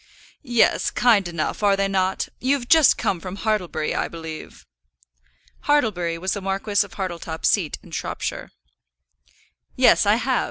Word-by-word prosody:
"Yes; 240 -5 +2
kind 220 -6 +3
enough; 170 +2 -3
are 200 -1 +4
they 195 0 0
not? 190 -1 0
You've 260 -1 0
just 320 -2 +5
come 180 - -1
from 185 +2 -7
Hartlebury, 185 -7 -1
I - - -1
believe." 160 -1 -9 1.0
Hartlebury 205 - +1
was 190 +3 -2
the 200 - -4
Marquis 195 +2 0
of 190 -3 -13
Hartletop's 170 -4 -3
seat 180 -8 0
in - - -16
Shropshire. - - -4 1.3
"Yes, - - +4
I - - +5
have. - - 0
195 Hz, 145 wpm, -22 LUFS, 175-220 Hz, 1.3 s, just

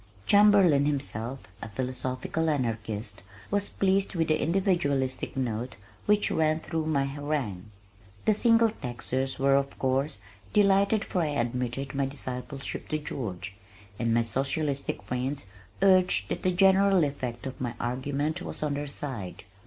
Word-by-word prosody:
Chamberlin, 195 - +6
himself 135 -3 -2 0.2
a 110 - -6
"philosophical 130 +7 -2
anarchist," 110 -6 -2 0.3
was 200 0 +1
pleased 195 0 +1
with 165 -2 +1
the 155 - +2
individualistic 160 -9 0
note 120 -1 -2 0.3
which 210 0 +3
ran 155 0 +2
through 160 -1 -3
my 140 -3 +2
harangue. 135 -9 -3 0.6
The 215 - +5
Single 230 +1 +4
Taxers 130 - -3
were 135 0 +3
of 140 0 0
course, 135 +1 0 0.4
delighted 200 +1 +4
for 180 - -1
I 160 - +1
admitted 125 -1 -2
my 140 -1 0
discipleship 135 0 -5
to 155 - -1
George, 110 -11 -5 0.5
and 115 -1 +1
my 115 +1 +3
socialistic 135 +1 -2
friends 125 +3 -3 0.4
urged 185 - +4
that - - -2
the 185 - +2
general 190 0 +5
effect 130 -5 -3
of 130 -1 -6
my 120 -2 -2
argument 140 +7 -1
was 180 - -5
on 150 -1 0
their 145 +1 -3
side. 130 -10 -5
140 Hz, 140 wpm, -28 LUFS, 125-165 Hz, 0.6 s, Chamberlin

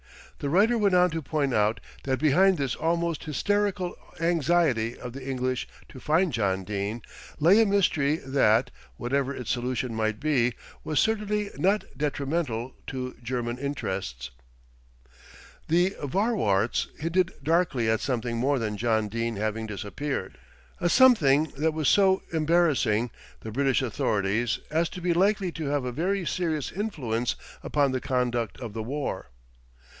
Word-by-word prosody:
The 140 - -2
writer 205 +9 +4
went 200 -3 +3
on 180 -1 +4
to 165 0 -3
point 145 -3 -1
out 105 +1 +2 0.3
that 130 -1 +1
behind 180 +6 +4
this 135 -4 -1
almost 170 0 -1
hysterical 195 +4 0 0.2
anxiety 165 -8 +1
of 125 -1 -8
the 135 0 -8
English 130 -1 -2 0.2
to 130 - -11
find 160 +4 +1
John 95 -4 0
Dene 105 +3 -3 0.4
lay 180 +8 +6
a - - +5
mystery 160 -8 +2
that, 130 -6 +2 0.3
whatever 135 +2 -1
its 125 -3 -4
solution 125 -1 -2
might 110 -1 -1
be, 125 -6 +1 0.3
was 155 - 0
certainly 210 -1 0
not 200 +3 +2
detrimental 140 -4 -2
to 130 -1 -5
German 120 0 -3
interests. 95 - -4 1.4
The 175 +4 +3
Vorwärts 145 - +1
hinted 170 +3 +1
darkly 160 -8 +1
at 110 0 +2
something 120 -3 -2
more 135 +4 +2
than 110 -3 -2
John 110 -1 +1
Dene 115 +2 -2
having 110 +2 -2
disappeared, 105 +2 -4 0.4
a 175 - +1
something 160 - +5
that 155 +2 0
was 155 -3 0
so 190 -2 +4
embarrassing 155 -9 +2 0.3
the 110 - -7
British 135 +2 +1
authorities, 110 -1 0
as 165 +2 +1
to 180 - -8
be 175 0 +1
likely 195 +1 +2
to 160 -3 -5
have 140 -2 0
a 125 - -2
very 180 +7 -1
serious 160 -3 -1
influence 130 - -2 0.3
upon 145 -2 +1
the 130 -1 -2
conduct 120 -4 -1
of 115 -5 -6
the 110 - -4
war. 130 - -4
140 Hz, 145 wpm, -27 LUFS, 115-170 Hz, 1.4 s, lay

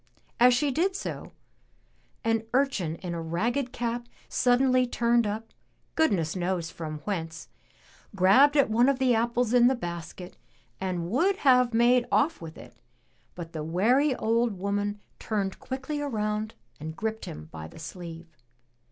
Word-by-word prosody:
As 245 +1 +6
she 280 +3 +1
did 365 +8 0
so, - - -5 0.9
an 225 -1 +1
urchin 230 - +1
in 175 -2 -4
a 170 - -4
ragged 235 +11 -1
cap 240 -1 -3 0.2
suddenly 255 0 +3
turned 235 -1 +2
up, 220 +2 -5 0.4
goodness 195 - +1
knows 175 -2 -2
from 155 -3 -6
whence, 165 -5 -4 0.7
grabbed 235 +11 +5
at 280 - +5
one 240 +4 +4
of 275 - +1
the 260 -2 +3
apples 235 +1 +1
in 245 -1 +6
the 260 - +3
basket 175 -3 -7 0.4
and 180 -2 -3
would 360 - +2
have 250 -2 +5
made 240 +1 +3
off 330 +2 +2
with 160 -1 -9
it, - - -13 0.6
but 170 -2 -8
the 155 -2 -4
wary 245 - +2
old 230 -2 0
woman 205 +2 -2 0.2
turned 200 -3 -2
quickly 270 +3 -4
around 215 -5 -2 0.2
and 160 +1 -6
gripped 220 +2 -3
him 75 +1 -8
by 80 -1 -8
the - - -15
sleeve. 165 0 -9
220 Hz, 150 wpm, -27 LUFS, 175-250 Hz, 0.9 s, As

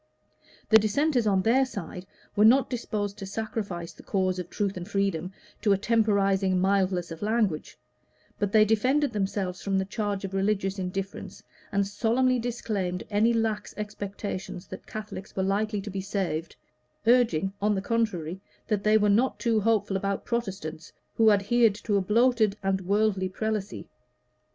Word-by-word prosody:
The 220 - +8
Dissenters, 245 +3 +1
on 190 -2 +2
their 250 +5 +4
side, 185 -6 -6 0.3
were 210 - +4
not 255 +6 +5
disposed 210 -4 -3
to 195 - -6
sacrifice 200 -5 -4
the - - -14
cause 185 -2 0
of 180 - -6
truth 200 -2 -2
and 180 0 -6
freedom 195 -3 -1 0.3
to 205 -3 +4
a - - +2
temporizing 195 -4 +2
mildness 185 -2 +1
of 165 - -8
language; 210 -6 0 0.6
but 205 -1 0
they 215 0 +6
defended 255 +6 +2
themselves 195 -2 -2
from 195 -1 0
the 190 - 0
charge 200 -1 -3
of 195 - -7
religious 195 0 0
indifference, 190 +1 -5 0.3
and 200 0 +1
solemnly 245 +5 +1
disclaimed 210 -6 -2
any 215 +3 +3
lax 225 -2 -1
expectations 200 -3 -5
that - - -10
Catholics 210 -2 -7
were 190 - 0
likely 205 +2 0
to 205 +1 -7
be 195 0 -3
saved 185 -5 -3 0.5
urging, 225 -7 +3
on 210 0 +2
the - - 0
contrary, 190 -7 -1 0.3
that 210 -3 0
they 215 +1 +5
were 210 -1 +2
not 225 +6 +2
too 230 -3 +2
hopeful 210 -2 +1
about 195 0 -2
Protestants 190 -9 -4 0.2
who 225 -1 +5
adhered 215 +2 +3
to 210 0 -2
a 200 - +3
bloated 220 0 +3
and 195 0 0
worldly 200 0 +1
Prelacy. 210 0 -3
205 Hz, 160 wpm, -27 LUFS, 190-220 Hz, 0.6 s, The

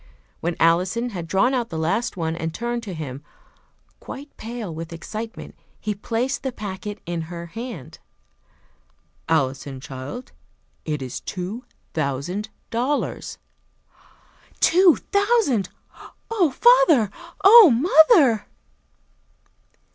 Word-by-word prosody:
When 170 +1 -2
Alison 185 +9 +2
had 175 -5 -6
drawn 195 +9 +2
out 245 -3 -1
the 165 - -5
last 190 +7 -1
one, 160 -1 -2
and 165 -1 -3
turned 240 +6 -3
to 200 -6 -7
him, 140 -3 -7 0.8
quite 285 +2 -10
pale 225 -5 -6
with 165 +1 -7
excitement, 215 +7 -7 0.3
he 210 - -2
placed 230 +6 -2
the 265 - -3
packet 205 -1 -6
in 170 -1 -3
her 170 -1 -6
hand. 225 - -8 1.3
"Alison, 135 -3 -1
child, 135 - -8 0.5
it 150 -3 -3
is 125 - -5
two 195 +7 -6 0.3
thousand 155 +8 -2 0.2
dollars!" 255 +6 -2 1.2
"Two 355 0 +6 0.2
thousand! 400 - +2 0.6
Oh, 385 -8 +3
father! 325 - +5 0.3
Oh, 420 -1 +10
mother!" 295 - +5
210 Hz, 110 wpm, -23 LUFS, 165-255 Hz, 1.3 s, Oh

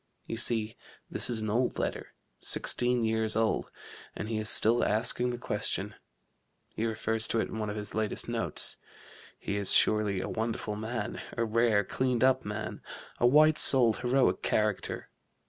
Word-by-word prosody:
You - - -6
see, 115 -2 +1 0.4
this - - +5
is 115 -2 +1
an 110 - -3
old 125 +3 -1
letter - - -5 0.2
sixteen 125 -1 0
years 110 -1 -1
old 110 -1 -1 0.5
and 105 - -7
he 110 -1 -3
is 110 0 0
still 115 +2 +5
asking 120 +3 -1
the 120 - -5
question: 120 - -3 0.8
he 115 - -4
refers 110 0 -1
to 115 - -2
it - - -3
in 110 - -7
one 105 -1 -4
of 105 - -6
his 105 -1 -4
latest 110 -1 -3
notes. - - -2 0.6
He 100 - -5
is 100 -2 +5
surely 105 -3 +2
a - - -5
wonderful 110 -1 -4
man 110 +3 -6 0.2
a 115 - 0
rare, 110 -2 +1
cleaned 125 +4 -2
up 130 0 +2
man 105 +1 -7 0.4
a 120 - +3
white 155 +4 +4
souled, 120 -5 +8
heroic 125 +1 0
character.... 105 -2 -3
110 Hz, 165 wpm, -28 LUFS, 110-120 Hz, 0.8 s, souled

